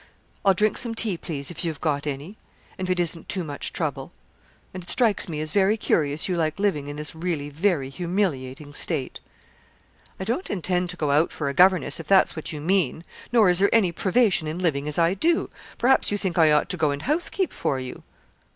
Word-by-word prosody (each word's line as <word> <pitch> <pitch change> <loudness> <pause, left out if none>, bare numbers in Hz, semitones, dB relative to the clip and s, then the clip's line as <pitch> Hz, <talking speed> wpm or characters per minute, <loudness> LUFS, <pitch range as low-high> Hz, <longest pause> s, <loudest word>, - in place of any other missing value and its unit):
I'll 195 -1 +5
drink 215 +3 +2
some 235 -2 -4
tea, 220 -4 -1
please, 150 -3 -5
if 175 - -6
you 170 - 0
have 155 - -6
got 150 -2 -1
any, 145 +8 -5 0.4
and 185 -1 -4
it 180 -1 +1
isn't 170 -1 -3
too 185 -3 -2
much 145 -3 -5
trouble; - - -3 0.6
and 185 - -6
it 175 - -14
strikes 220 -7 +1
me 155 -2 -3
as 155 0 -4
very 200 +2 +3
curious 150 -7 0
you 185 - 0
like 155 -2 0
living 195 -8 0
in 145 - -5
this 150 0 -5
really 160 -3 -3
very 155 -3 0
humiliating 145 -4 -2
state.' 150 -4 -3 1.0
'I - - -3
don't 235 - -2
intend 180 -1 -1
to 180 - -5
go 150 -4 0
out 150 +4 +3
for 145 -3 -3
a - - -3
governess, 180 -3 +4
if 165 - -8
that's 195 -1 +4
what 160 - -4
you 150 - -5
mean; 165 -1 0 0.3
nor 230 -4 +5
is 180 0 +4
there 200 +1 +4
any 210 -6 +4
privation 190 -1 +2
in 155 +2 -3
living 150 -6 0
as 150 - -1
I 170 +1 +3
do. 330 - +1 0.3
Perhaps 265 +2 +3
you 205 - +1
think 190 -4 -2
I 160 -3 +5
ought 150 0 +3
to 180 - -3
go 155 -3 +2
and 140 0 -3
housekeep 345 +5 -1
for 135 - -1
you.' 130 -1 -7
170 Hz, 215 wpm, -24 LUFS, 150-195 Hz, 1.0 s, I'll